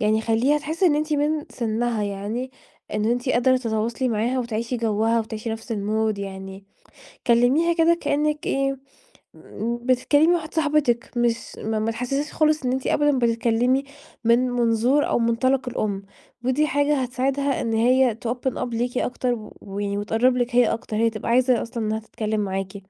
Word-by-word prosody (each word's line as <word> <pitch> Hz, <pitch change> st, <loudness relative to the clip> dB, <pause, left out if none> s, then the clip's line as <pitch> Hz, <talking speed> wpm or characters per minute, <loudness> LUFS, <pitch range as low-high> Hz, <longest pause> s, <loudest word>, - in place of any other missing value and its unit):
يعني 215 Hz, +1 st, +2 dB
خَلِّيها 230 Hz, +7 st, +2 dB
تحس 315 Hz, +4 st, -5 dB
إنّ 345 Hz, -5 st, +5 dB
أنتِ 305 Hz, +1 st, -1 dB
من 295 Hz, +1 st, 0 dB
سنّها 230 Hz, -1 st, -1 dB
يعني، 205 Hz, +6 st, -4 dB, 0.4 s
إن 210 Hz, -, 0 dB
أنتِ 245 Hz, +3 st, 0 dB
قادرة 255 Hz, +1 st, +3 dB
تتواصلي 230 Hz, +1 st, -1 dB
معاها 235 Hz, +3 st, 0 dB
وتعيشي 235 Hz, 0 st, -2 dB
جَوّها 225 Hz, 0 st, +1 dB
وتعيشي 220 Hz, +1 st, -5 dB
نفس 225 Hz, +1 st, -5 dB
المود 215 Hz, 0 st, -1 dB
يعني، 195 Hz, 0 st, -7 dB, 0.6 s
كلميها 255 Hz, +8 st, +4 dB
كده 335 Hz, 0 st, +3 dB
كأنك 300 Hz, +1 st, 0 dB
إيه، 275 Hz, 0 st, 0 dB, 1.1 s
بتتكلمي 260 Hz, +5 st, +3 dB
مع 350 Hz, -, +4 dB
واحدة 315 Hz, -2 st, -3 dB
صاحبتِك 295 Hz, -6 st, +1 dB
مش 235 Hz, -1 st, -1 dB
ما 220 Hz, +1 st, -1 dB
تحسسيهاش 275 Hz, +6 st, -3 dB
خالص 310 Hz, -1 st, +2 dB
إن 250 Hz, -, +1 dB
انتِ 260 Hz, 0 st, -2 dB
أبدًا 290 Hz, -2 st, +2 dB
بتتكلمي 235 Hz, +3 st, +1 dB, 0.4 s
من 240 Hz, +2 st, +3 dB
منظور 245 Hz, +3 st, +2 dB
أو -, -, +2 dB
منطلق 250 Hz, +3 st, +1 dB
الأم. 205 Hz, -5 st, -2 dB, 0.4 s
ودي 260 Hz, +4 st, +2 dB
حاجة 285 Hz, -1 st, +1 dB
هتساعدها 270 Hz, +2 st, -1 dB
إن 225 Hz, -, -2 dB
هي 240 Hz, 0 st, +3 dB
تopen 250 Hz, +2 st, -1 dB
up -, -, -1 dB
ليكِ 245 Hz, +2 st, -1 dB
أكتر، 250 Hz, 0 st, -1 dB
و 215 Hz, -2 st, -10 dB, 0.4 s
وتقرّب 235 Hz, +5 st, +2 dB
لِك 245 Hz, 0 st, -1 dB
هي 245 Hz, -2 st, +6 dB
أكتر، 225 Hz, -1 st, -4 dB
هي 230 Hz, +1 st, +3 dB
تبقى 215 Hz, +1 st, -5 dB
عايزة 250 Hz, 0 st, +3 dB
أصلًا 230 Hz, -2 st, -4 dB
إنها 215 Hz, +1 st, -1 dB
تتكلم 215 Hz, -1 st, -3 dB
معاكِ. 195 Hz, 0 st, -3 dB
240 Hz, 160 wpm, -23 LUFS, 225-270 Hz, 1.1 s, هي